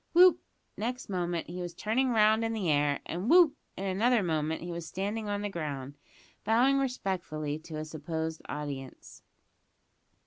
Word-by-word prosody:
Whoop! 360 Hz, +1 st, +7 dB, 0.4 s
next 245 Hz, +3 st, -3 dB
moment 175 Hz, -3 st, -1 dB
he 180 Hz, +2 st, -6 dB
was 175 Hz, -1 st, -5 dB
turning 255 Hz, +5 st, +1 dB
round 220 Hz, -1 st, +4 dB
in 225 Hz, 0 st, 0 dB
the 195 Hz, -7 st, 0 dB
air; 145 Hz, -1 st, +2 dB
and 180 Hz, +7 st, -3 dB
whoop! 335 Hz, -4 st, +7 dB, 0.2 s
in 195 Hz, -, -4 dB
another 215 Hz, +4 st, +2 dB
moment 160 Hz, -1 st, -1 dB
he 175 Hz, -, -5 dB
was 170 Hz, -1 st, -5 dB
standing 205 Hz, +3 st, -3 dB
on 205 Hz, 0 st, -2 dB
the -, -, 0 dB
ground, 145 Hz, -6 st, -5 dB, 0.5 s
bowing 255 Hz, +5 st, +4 dB
respectfully 175 Hz, -, -2 dB
to 160 Hz, 0 st, -9 dB
a 155 Hz, -, -4 dB
supposed 160 Hz, +1 st, -4 dB
audience. 140 Hz, -3 st, -6 dB
180 Hz, 160 wpm, -30 LUFS, 155-225 Hz, 0.5 s, Whoop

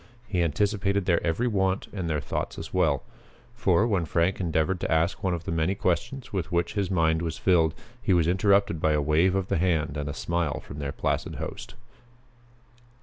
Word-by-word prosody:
He 90 Hz, -4 st, 0 dB
anticipated 100 Hz, +4 st, +1 dB
their 85 Hz, -2 st, +2 dB
every 85 Hz, +9 st, 0 dB
want 95 Hz, -3 st, 0 dB
and 90 Hz, -5 st, -3 dB
their 75 Hz, -1 st, 0 dB
thoughts -, -, -4 dB
as -, -, -7 dB
well. -, -, +2 dB, 0.5 s
For, 105 Hz, -3 st, +2 dB
when 100 Hz, -7 st, +1 dB
Frank 85 Hz, +4 st, +1 dB
endeavored 85 Hz, +1 st, 0 dB
to -, -, -3 dB
ask 80 Hz, +5 st, +1 dB
one 95 Hz, -2 st, +1 dB
of 85 Hz, -, -7 dB
the -, -, -4 dB
many 80 Hz, +4 st, +1 dB
questions 105 Hz, +9 st, -2 dB
with 90 Hz, -5 st, -2 dB
which 85 Hz, 0 st, 0 dB
his 100 Hz, -3 st, -1 dB
mind 80 Hz, -3 st, +2 dB
was 80 Hz, -2 st, -3 dB
filled, 80 Hz, -4 st, +3 dB, 0.3 s
he 100 Hz, -, 0 dB
was 85 Hz, -3 st, +4 dB
interrupted 100 Hz, -2 st, +2 dB
by 80 Hz, -, +3 dB
a 75 Hz, -, +2 dB
wave 80 Hz, +6 st, +3 dB
of 95 Hz, -1 st, 0 dB
the -, -, 0 dB
hand 80 Hz, -5 st, 0 dB
and 75 Hz, 0 st, -3 dB
a -, -, -3 dB
smile 85 Hz, -4 st, -1 dB
from 70 Hz, -, -10 dB
their 70 Hz, -1 st, -3 dB
placid -, -, -2 dB
host. -, -, -7 dB
85 Hz, 200 wpm, -26 LUFS, 80-95 Hz, 0.5 s, was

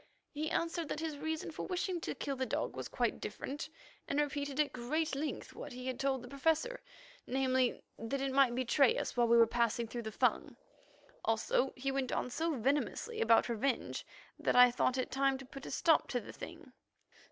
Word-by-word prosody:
He 310 Hz, +1 st, -2 dB
answered 335 Hz, -1 st, -1 dB
that -, -, -2 dB
his 315 Hz, -3 st, -4 dB
reason 315 Hz, +1 st, -3 dB
for -, -, -5 dB
wishing 360 Hz, -1 st, -1 dB
to -, -, -3 dB
kill 280 Hz, -1 st, -3 dB
the 260 Hz, -, -1 dB
dog -, -, -2 dB
was -, -, -4 dB
quite -, -, -1 dB
different, 295 Hz, +3 st, -5 dB, 0.4 s
and 280 Hz, -, 0 dB
repeated 285 Hz, -1 st, -1 dB
at 295 Hz, -2 st, +2 dB
great 300 Hz, +6 st, -1 dB
length 290 Hz, +3 st, -3 dB
what -, -, -8 dB
he 250 Hz, +1 st, -7 dB
had 260 Hz, -1 st, -3 dB
told 270 Hz, -2 st, 0 dB
the -, -, -8 dB
Professor—namely, 275 Hz, -, -1 dB, 0.2 s
that 225 Hz, +5 st, -2 dB
it 270 Hz, 0 st, -1 dB
might 265 Hz, -3 st, +4 dB
betray 255 Hz, +1 st, +3 dB
us -, -, -3 dB
while 240 Hz, -1 st, +3 dB
we 235 Hz, 0 st, +6 dB
were 230 Hz, -, +8 dB
passing 235 Hz, 0 st, 0 dB
through 240 Hz, +2 st, -5 dB
the 220 Hz, -1 st, -5 dB
Fung. -, -, +1 dB, 0.7 s
Also 225 Hz, +4 st, +1 dB
he 270 Hz, +2 st, -2 dB
went 270 Hz, -2 st, -1 dB
on 250 Hz, -, -1 dB
so 320 Hz, +4 st, 0 dB
venomously 290 Hz, -, -1 dB
about 230 Hz, -, +5 dB
revenge 240 Hz, +2 st, -1 dB, 0.4 s
that -, -, +1 dB
I 250 Hz, 0 st, +9 dB
thought 250 Hz, +1 st, +1 dB
it 255 Hz, -, -2 dB
time 270 Hz, 0 st, +2 dB
to 270 Hz, -, -10 dB
put 275 Hz, +1 st, -9 dB
a -, -, -5 dB
stop 320 Hz, -2 st, +3 dB
to 245 Hz, -, -1 dB
the -, -, -10 dB
thing. -, -, -10 dB
270 Hz, 200 wpm, -34 LUFS, 250-305 Hz, 0.7 s, I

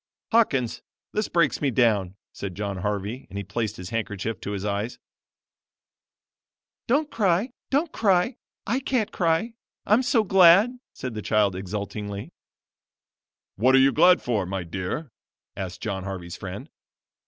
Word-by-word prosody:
"Hawkins, 140 Hz, -, +2 dB, 0.3 s
this 215 Hz, 0 st, 0 dB
breaks 170 Hz, -4 st, +1 dB
me 145 Hz, -, +2 dB
down," 105 Hz, -7 st, +2 dB, 0.2 s
said 95 Hz, -3 st, -6 dB
John 100 Hz, -1 st, -3 dB
Harvey 105 Hz, +5 st, -3 dB
and 100 Hz, -, -7 dB
he 100 Hz, -, -3 dB
placed 105 Hz, +2 st, -3 dB
his 90 Hz, 0 st, -8 dB
handkerchief 110 Hz, -2 st, -3 dB
to 100 Hz, -, -4 dB
his 100 Hz, 0 st, -4 dB
eyes. 105 Hz, +3 st, -2 dB, 1.9 s
"Don't 290 Hz, +4 st, +1 dB
cry, 200 Hz, +2 st, +1 dB, 0.2 s
don't 295 Hz, +4 st, +1 dB
cry; 205 Hz, +4 st, +2 dB, 0.3 s
I 240 Hz, +6 st, 0 dB
can't 250 Hz, -5 st, -1 dB
cry, 170 Hz, +6 st, +1 dB, 0.3 s
I'm 215 Hz, +4 st, +4 dB
so 240 Hz, -3 st, +2 dB
glad," 195 Hz, +6 st, +6 dB
said 130 Hz, -2 st, -6 dB
the 110 Hz, -, -4 dB
child 105 Hz, -3 st, +2 dB
exultingly. 100 Hz, +1 st, -5 dB, 1.3 s
"What 130 Hz, +6 st, +4 dB
are -, -, +7 dB
you 135 Hz, +1 st, +6 dB
glad 180 Hz, +4 st, +5 dB
for, 105 Hz, -7 st, 0 dB
my 95 Hz, -1 st, -3 dB
dear?" 95 Hz, -, -4 dB, 0.4 s
asked 95 Hz, -1 st, -6 dB
John 100 Hz, -4 st, -3 dB
Harvey's 90 Hz, -3 st, -6 dB
friend. -, -, -8 dB
115 Hz, 140 wpm, -25 LUFS, -, 1.9 s, are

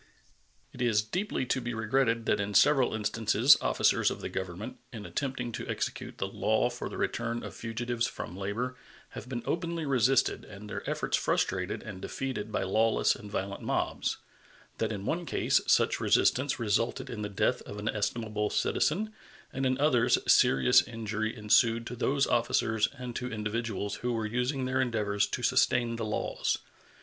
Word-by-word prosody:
It 125 Hz, -, -8 dB
is 110 Hz, -3 st, +3 dB
deeply 180 Hz, -, -2 dB
to 130 Hz, +1 st, 0 dB
be 120 Hz, -1 st, -4 dB
regretted 115 Hz, +1 st, +1 dB
that 105 Hz, -, +2 dB
in 100 Hz, 0 st, -2 dB
several 135 Hz, 0 st, +5 dB
instances 110 Hz, +4 st, +4 dB
officers -, -, +3 dB
of -, -, -5 dB
the -, -, -5 dB
Government, 95 Hz, +5 st, -5 dB
in 110 Hz, -4 st, -8 dB
attempting 130 Hz, -4 st, -3 dB
to -, -, -6 dB
execute -, -, -4 dB
the -, -, -1 dB
law -, -, +1 dB
for -, -, -5 dB
the -, -, -7 dB
return 120 Hz, 0 st, -2 dB
of -, -, -7 dB
fugitives 120 Hz, +1 st, -2 dB
from 85 Hz, -, -7 dB
labor, 105 Hz, +6 st, -3 dB, 0.3 s
have 125 Hz, -, -9 dB
been 120 Hz, -3 st, -4 dB
openly 170 Hz, -1 st, -2 dB
resisted 130 Hz, -1 st, +2 dB
and 100 Hz, +2 st, -11 dB
their -, -, -5 dB
efforts -, -, 0 dB
frustrated -, -, -1 dB
and 95 Hz, -2 st, -8 dB
defeated 125 Hz, -5 st, -4 dB
by -, -, 0 dB
lawless 110 Hz, +4 st, +2 dB
and 105 Hz, -, -10 dB
violent 100 Hz, -1 st, -3 dB
mobs; -, -, -1 dB, 0.6 s
that -, -, 0 dB
in 100 Hz, -2 st, -5 dB
one 170 Hz, +7 st, -1 dB
case -, -, +2 dB
such -, -, +3 dB
resistance 130 Hz, +1 st, +2 dB
resulted 115 Hz, +1 st, 0 dB
in 110 Hz, -3 st, -6 dB
the 105 Hz, -, -3 dB
death 100 Hz, -, 0 dB
of 105 Hz, -, -7 dB
an 105 Hz, +1 st, -5 dB
estimable 105 Hz, 0 st, -1 dB
citizen, 215 Hz, +7 st, 0 dB, 0.4 s
and 135 Hz, 0 st, 0 dB
in 130 Hz, 0 st, +1 dB
others 125 Hz, -4 st, +3 dB
serious 65 Hz, -1 st, +6 dB
injury 110 Hz, 0 st, -3 dB
ensued 115 Hz, +2 st, +3 dB
to 125 Hz, -, -6 dB
those 135 Hz, +3 st, +1 dB
officers 110 Hz, -2 st, +1 dB
and 125 Hz, -1 st, -6 dB
to 125 Hz, 0 st, -3 dB
individuals 105 Hz, -2 st, -3 dB
who 125 Hz, -, -2 dB
were 110 Hz, -1 st, -1 dB
using 125 Hz, +4 st, -1 dB
their 130 Hz, +1 st, +1 dB
endeavors 105 Hz, -5 st, 0 dB
to -, -, -4 dB
sustain 120 Hz, -2 st, +2 dB
the 115 Hz, -, -3 dB
laws. 105 Hz, -, -1 dB
115 Hz, 170 wpm, -29 LUFS, 105-125 Hz, 0.6 s, serious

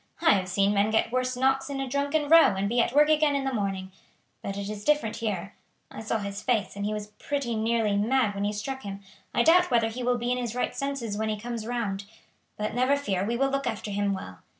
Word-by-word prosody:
I 330 Hz, -, +6 dB
have 185 Hz, -2 st, +1 dB
seen 200 Hz, +2 st, +2 dB
men 205 Hz, +1 st, +2 dB
get 220 Hz, +1 st, +1 dB
worse 255 Hz, 0 st, -1 dB
knocks 270 Hz, +2 st, +1 dB
in 275 Hz, -1 st, -3 dB
a 270 Hz, -, -2 dB
drunken 285 Hz, +3 st, 0 dB
row 325 Hz, -9 st, +7 dB
and 195 Hz, +1 st, -1 dB
be 235 Hz, +3 st, +2 dB
at 235 Hz, -, 0 dB
work 295 Hz, +3 st, +5 dB
again 305 Hz, -2 st, +3 dB
in 275 Hz, -, 0 dB
the 270 Hz, -1 st, -2 dB
morning; 195 Hz, -3 st, -2 dB, 0.5 s
but 195 Hz, 0 st, -5 dB
it 200 Hz, 0 st, -4 dB
is 210 Hz, 0 st, -6 dB
different 295 Hz, -6 st, +1 dB
here. 200 Hz, -4 st, -3 dB, 0.4 s
I -, -, -8 dB
saw 220 Hz, +1 st, -1 dB
his 200 Hz, -1 st, -5 dB
face, 215 Hz, -6 st, 0 dB
and 200 Hz, 0 st, -3 dB
he -, -, -2 dB
was 210 Hz, 0 st, -5 dB
pretty 280 Hz, -5 st, -2 dB
nearly 220 Hz, -1 st, +1 dB
mad 220 Hz, +1 st, +2 dB
when 200 Hz, 0 st, -3 dB
you 205 Hz, -, 0 dB
struck 265 Hz, +6 st, -4 dB
him. 200 Hz, -2 st, -7 dB, 0.3 s
I 240 Hz, -, +2 dB
doubt 355 Hz, +5 st, +5 dB
whether 230 Hz, -3 st, +2 dB
he 240 Hz, +3 st, -6 dB
will 245 Hz, 0 st, +1 dB
be 240 Hz, +1 st, -2 dB
in 250 Hz, -, 0 dB
his 240 Hz, -2 st, -3 dB
right 250 Hz, -, -1 dB
senses 260 Hz, -7 st, -3 dB
when 220 Hz, 0 st, -1 dB
he 215 Hz, -1 st, -2 dB
comes 230 Hz, 0 st, -5 dB
round; 205 Hz, -5 st, -2 dB, 0.5 s
but 210 Hz, 0 st, -2 dB
never 255 Hz, +4 st, +2 dB
fear, 195 Hz, -10 st, -1 dB
we 235 Hz, +4 st, -1 dB
will 270 Hz, +1 st, +1 dB
look 275 Hz, -1 st, -1 dB
after 215 Hz, -2 st, -3 dB
him 200 Hz, 0 st, 0 dB
well. 95 Hz, -, -6 dB
230 Hz, 250 wpm, -27 LUFS, 205-265 Hz, 0.5 s, row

